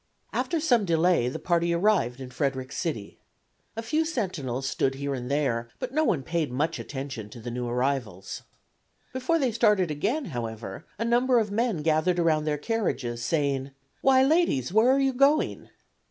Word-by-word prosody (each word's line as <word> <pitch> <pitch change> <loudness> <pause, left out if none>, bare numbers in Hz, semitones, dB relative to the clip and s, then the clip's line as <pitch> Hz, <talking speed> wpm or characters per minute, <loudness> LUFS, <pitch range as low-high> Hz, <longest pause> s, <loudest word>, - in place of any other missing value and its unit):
After 335 - 0
some 245 -8 +3
delay 170 -7 +2
the - - -5
party 170 -1 +1
arrived 170 - +2
in 130 -1 -8
Frederick 130 0 -2
City. 145 - -4 0.6
A 225 - -4
few 305 +8 +1
sentinels 165 - -3
stood 135 0 0
here 140 +1 -3
and 125 -2 -5
there, 125 -5 0
but 255 0 -5
no 310 +2 +2
one 160 - +1
paid 160 -2 -1
much 150 +6 -1
attention 130 -6 -6
to 120 - -11
the 120 +1 -6
new 120 0 -3
arrivals. 120 -6 -2 0.7
Before 260 +6 +1
they 265 -6 +1
started 210 -6 +3
again, 215 - -1
however, 110 -4 -5
a 230 - -2
number 245 +2 +3
of 215 -3 +1
men 215 -7 0
gathered 160 +3 +2
around 160 -3 +2
their 150 -1 0
carriages, 145 - -2
saying: 140 -2 0 0.3
"Why, 265 -1 +5
ladies, 270 - +2
where 220 +4 +5
are 270 - +3
you 270 -1 +2
going?" 275 +4 +2
160 Hz, 170 wpm, -27 LUFS, -, 0.7 s, Why